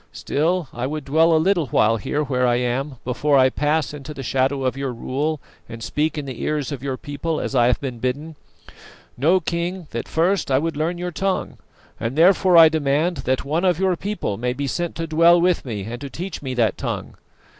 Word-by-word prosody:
Still, 165 +2 -1
I 120 +2 -3
would 150 0 -5
dwell 160 +4 +3
a 160 - +5
little 170 -1 +2
while 115 -1 +3
here 145 +8 -2
where 125 -3 +1
I 120 - +3
am 125 +3 -1
before 140 +3 +2
I 130 0 +5
pass 150 +2 0
into 150 +1 -8
the 135 - -6
shadow 135 +2 0
of 130 0 0
your 135 -1 -3
rule 140 +6 -2 0.3
and 115 -1 -8
speak 155 +5 -1
in 145 - -3
the 130 -3 -7
ears 150 -2 -1
of 140 -4 -5
your 135 -1 -3
people 150 +3 -3
as - - -4
I 120 -2 +4
have 125 - +2
been 130 -4 -5
bidden. 145 +6 -3 0.8
Know, 165 +9 +3
King, 175 +2 -3
that 115 - -4
first 175 +1 +1
I 130 - +3
would 160 +2 -1
learn 160 +4 -1
your 180 0 -4
tongue, 190 +3 -2 0.4
and 115 +3 -3
therefore 180 +2 +5
I 165 -1 +10
demand 155 +2 +1
that 130 +1 0
one 155 +5 -1
of 180 -3 +3
your 190 0 +1
people 185 - -3
may 125 +1 -1
be 140 +2 -3
sent 175 +5 -3
to 165 - -3
dwell 165 +2 +5
with 175 -2 +1
me 105 -6 -4
and 120 +4 -7
to 140 - -6
teach 175 +7 -6
me 130 -3 -4
that 115 -5 +1
tongue. - - -4
145 Hz, 220 wpm, -22 LUFS, 130-165 Hz, 0.8 s, I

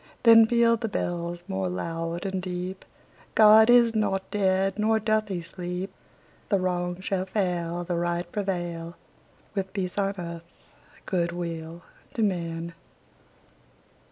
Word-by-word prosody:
Then 225 -1 +8
pealed 235 -1 +3
the 225 - -1
bells 175 -3 -3
more 190 -1 -2
loud 165 0 -4
and 190 -1 -2
deep: 180 +1 -5 0.5
"God 220 +1 +8
is 240 -2 +6
not 200 -3 -1
dead; 195 0 +1
nor 220 +1 +3
doth 215 0 +1
he 180 -4 -4
sleep! 180 +2 -5 0.6
The 200 - +3
Wrong 180 -1 -1
shall 190 -1 -2
fail, 175 -3 -1
The 175 0 -2
Right 175 0 -1
prevail, 175 -4 -3 0.6
With 190 -2 -3
peace 190 -1 -3
on 195 0 0
earth, 170 -1 -7 0.6
good 170 -2 0
will 170 -1 -6 0.3
to 225 - +1
men!" 170 -3 -2
185 Hz, 130 wpm, -26 LUFS, 175-205 Hz, 0.6 s, Then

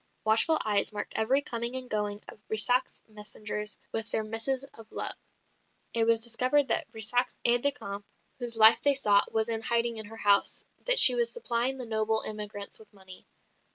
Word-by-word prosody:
Watchful 225 +9 +3
eyes 205 -1 +1
marked 205 -1 -5
every 260 +6 +1
coming 235 0 -5
and 255 -1 -4
going 210 -2 -4
of - - -14
Brissac's 245 +4 0
messengers 210 0 -4
with 225 0 -4
their 220 - -2
missives 225 +5 -2
of 225 -1 -15
love; - - 0 0.8
it 230 -1 +2
was 225 0 +1
discovered 255 +4 0
that - - +1
Brissac's 235 +2 -3
aide 240 0 +4
de 285 - +1
camp, 200 -7 -9 0.4
whose 240 -2 -3
life 225 +1 +7
they 285 +1 +4
sought, 205 -7 +2
was 220 0 -1
in 225 -1 -3
hiding 235 0 -1
in 220 -1 -7
her 225 +1 -13
house; 200 -2 +3 0.2
that - - +3
she - - +11
was 475 -1 0
supplying 260 - -2
the 255 - -7
noble 220 0 -1
emigrants 210 -1 -6
with 215 -2 -19
money. 190 -2 -13
225 Hz, 185 wpm, -27 LUFS, 215-245 Hz, 0.8 s, she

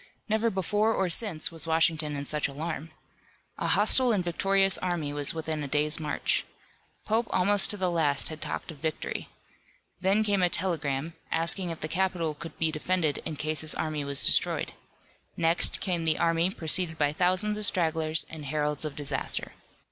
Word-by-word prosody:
Never 220 +1 +2
before 210 +3 +1
or 190 -2 0
since 170 -6 +3
was 165 0 -10
Washington 160 -2 +2
in 140 0 -4
such 150 +1 0
alarm. 155 +2 -5 0.7
A - - -1
hostile 255 -2 +4
and 200 -5 +1
victorious 195 +2 +2
army 170 -5 -2
was 145 +2 -1
within 160 -1 -2
a 145 - -3
day's 150 +2 +1
march. 150 -2 0 0.6
Pope 225 +2 +1
almost 195 +2 +2
to 210 - +2
the 185 -2 0
last 150 -5 +2
had 155 -1 -8
talked - - -3
of 150 - -13
victory. 160 0 -3 0.7
Then 195 +3 +3
came 200 -3 +2
a 180 - +4
telegram, 160 -4 -1 0.2
asking 170 +3 +1
if 165 - -6
the 155 - 0
capital 175 -2 0
could 165 +2 -10
be 160 -1 +2
defended 155 -1 0
in 160 - -4
case 155 0 -2
his 155 -1 -1
army 155 -2 -2
was 140 -1 +1
destroyed. - - +2 0.6
Next 165 +1 +1
came 175 -4 -1
the 160 -1 +2
army 165 +1 +2
preceded 165 -2 0
by 145 -1 +1
thousands 185 +5 +1
of 210 - +1
stragglers 160 -2 +1
and 155 -2 -9
heralds 150 +1 -1
of 150 - -4
disaster. 145 -2 -2
165 Hz, 175 wpm, -28 LUFS, 155-185 Hz, 0.7 s, hostile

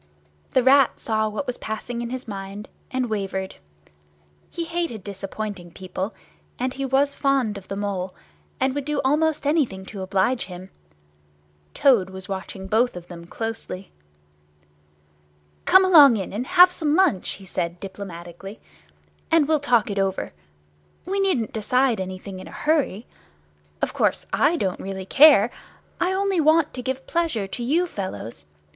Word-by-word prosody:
The 260 - +4
Rat 270 0 +5
saw 220 -1 0
what 215 +7 -4
was 250 -2 -4
passing 235 +2 -4
in 235 - -4
his 255 +1 -6
mind, 200 0 -7 0.2
and 255 -1 -1
wavered. 195 -3 -3 0.9
He 340 - -4
hated 330 - -3
disappointing 200 -1 -6
people, 190 +3 -5 0.4
and 255 +1 -2
he 275 0 -3
was 275 +2 +2
fond 270 -7 +1
of 195 -2 -9
the 195 - -4
Mole, 195 -2 -3 0.4
and 265 0 +1
would 285 -1 -3
do 300 0 -1
almost 305 +2 +1
anything 275 -11 0
to 200 0 -8
oblige 195 +6 +1
him. 185 +1 -10 1.0
Toad 235 -10 +4
was 190 -1 -8
watching 190 0 -6
both 225 +4 +2
of 175 -1 -9
them 170 -1 -9
closely. 225 -3 -6 1.7
"Come 375 +1 +6
along 290 -10 +8
in, 195 -2 -5
and 240 +5 -3
have 360 0 +7
some 310 -4 0
lunch," 340 - +2
he 195 - -10
said, 175 -1 -3
diplomatically, 190 0 -9 0.7
"and 325 -3 +4
we'll 310 -1 +3
talk 245 -7 +2
it 200 - -2
over. 195 - -1 0.7
We 390 +3 -1
needn't 355 - +1
decide 245 +1 +1
anything 185 +1 -6
in 185 - -10
a - - -11
hurry. 290 -8 0 0.8
Of - - 0
course, - - +1
I 320 +4 +3
don't 190 - -2
really 190 -1 -5
care. 270 -2 +7 0.5
I 360 - +1
only 385 -2 +1
want 315 0 +3
to 250 - -5
give 260 +1 -4
pleasure 330 -12 -1
to 240 - -5
you 320 +9 +2
fellows. 115 - -6
225 Hz, 155 wpm, -23 LUFS, 190-285 Hz, 1.7 s, along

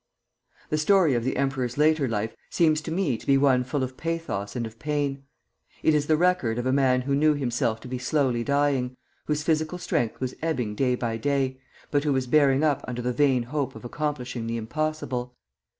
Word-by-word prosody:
The 155 - +1
story 175 -2 +4
of 120 -1 0
the 130 - -1
emperor's 135 -2 -1
later 150 -2 +3
life 110 -1 -2
seems 155 -2 +2
to 160 - -6
me 165 -9 0
to - - -15
be 135 -1 +5
one 135 -2 +4
full 130 +2 -2
of 130 0 -5
pathos 165 -12 -3
and 120 -2 -2
of 115 0 -10
pain. 145 -1 -2 0.6
It 160 - +4
is 150 -1 +1
the 155 - +3
record 175 -10 +2
of 120 - -2
a 130 - +2
man 130 -2 +3
who 140 +2 -2
knew 150 +2 +4
himself 120 -4 -1
to - - -9
be 125 0 -4
slowly 130 -3 +1
dying, 140 -2 +1 0.3
whose 150 0 -1
physical 160 +2 0
strength 120 -9 -1
was 130 -1 -3
ebbing 130 -10 -1
day 125 +3 +1
by 115 -2 -2
day, 135 +1 0 0.3
but 145 -1 +2
who 150 -2 +1
was 130 -1 0
bearing 140 +1 +4
up 145 -3 +1
under 125 -1 -4
the 125 0 0
vain 135 -3 +3
hope 135 +1 -3
of - - -10
accomplishing 125 -4 -3
the 115 0 -2
impossible. 125 0 -3
135 Hz, 205 wpm, -26 LUFS, 125-150 Hz, 0.6 s, be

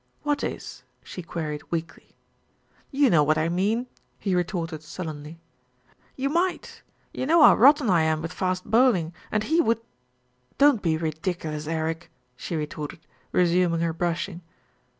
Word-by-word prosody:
"What 290 -1 0
is?" - - -5 0.2
she 180 - -8
queried 155 -3 -4
weakly. 165 -1 -5 0.7
"You 275 -3 +3
know 155 - +5
what 155 +1 +2
I 160 +1 +1
mean," 205 +8 0 0.3
he 195 - -2
retorted 175 -3 -2
sullenly. 155 -1 -7 0.8
"You 270 +1 -1
might, 345 +5 -1 0.3
you 260 - -3
know 325 0 +6
how - - +9
rotten 280 +2 +6
I 175 -4 +4
am 160 0 0
with 165 +2 -5
fast 185 -1 -2
bowl 245 +1 +4
ing, 165 -1 -4 0.2
and 215 0 +1
he 325 +6 +2
would 230 -7 +1 0.4
" 125 0 -41
"Don't 280 -6 +5
be 160 -3 +1
ridiculous, 160 -1 -3
Eric," 160 +1 -3 0.3
she 165 - -5
retorted, 150 0 -5 0.3
resuming 175 -1 +2
her 165 -1 0
brushing. 170 +1 -2
170 Hz, 150 wpm, -25 LUFS, 160-220 Hz, 0.8 s, how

